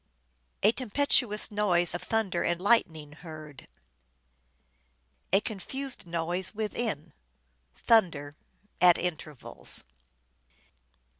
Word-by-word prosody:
" 60 0 -44
A 210 - +6
tempestuous 240 -3 +2
noise 185 -5 +2
of - - -4
thunder 210 -6 -1
and 175 0 -1
lightning 165 -8 +1
heard." 155 -3 -12 1.6
"A 195 +2 +4
confused 245 +3 -5
noise 175 +4 -2
within." 215 -6 -3 0.6
"Thunder" 165 -11 +1 0.5
(at 180 -1 +7
intervals). 155 -5 -2
180 Hz, 85 wpm, -28 LUFS, 160-220 Hz, 1.6 s, at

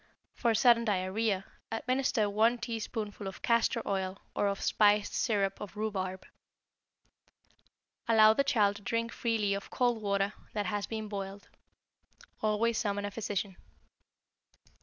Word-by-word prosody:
For 230 -2 +1
sudden 235 +1 +5
diarrhoea, 195 0 0 0.3
administer 250 -1 +1
one 220 +4 +3
teaspoonful 220 -3 -4
of 190 - -8
castor 230 0 +2
oil 190 -1 -1 0.2
or 205 - +2
of 200 0 -1
spiced 210 -1 +3
syrup 200 -4 0
of 210 0 -8
rhubarb. 190 -3 -3 1.8
Allow 220 -1 +7
the 275 - +2
child 210 -8 +2
to - - -13
drink 230 +2 -1
freely 220 -4 0
of 200 0 -5
cold 245 -3 +1
water 200 0 0 0.2
that 210 -1 -1
has 205 +2 -2
been 220 -1 -4
boiled. 200 -1 -6 0.9
Always 220 +2 +1
summon 205 -2 -1
a 205 - -4
physician. 200 -2 -3
210 Hz, 130 wpm, -31 LUFS, 200-230 Hz, 1.8 s, Allow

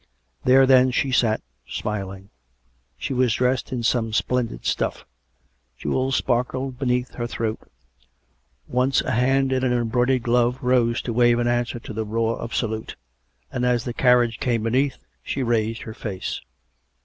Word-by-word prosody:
There, 135 +1 +6
then, 130 -1 +6
she 130 +1 0
sat, 115 -3 +2 0.2
smiling. 95 -2 -5 0.7
She - - -3
was 125 -2 +2
dressed 125 0 0
in 125 -2 -2
some 115 -1 +1
splendid 115 - -1
stuff; - - -1 0.7
jewels 130 - 0
sparkled 130 +1 -1
beneath 125 -1 0
her 120 -1 -3
throat. 115 -2 -3 1.1
Once 125 +2 +2
a - - -2
hand 135 +3 +2
in 130 0 0
an 130 - +2
embroidered 120 +1 +1
glove 120 +1 +2
rose 125 -2 +2
to 120 - -3
wave 120 0 +4
an 120 0 +1
answer 120 0 0
to 110 - -8
the 110 +1 -2
roar 115 +2 -1
of 115 - -5
salute; 110 -2 -2 0.6
and, 125 - -2
as 125 -2 +2
the 120 - -4
carriage 120 -2 +3
came 115 -3 0
beneath, 130 +4 +1 0.2
she 135 - -3
raised 115 -1 0
her 110 - -7
face. 100 -5 -5
120 Hz, 155 wpm, -23 LUFS, 115-130 Hz, 1.1 s, There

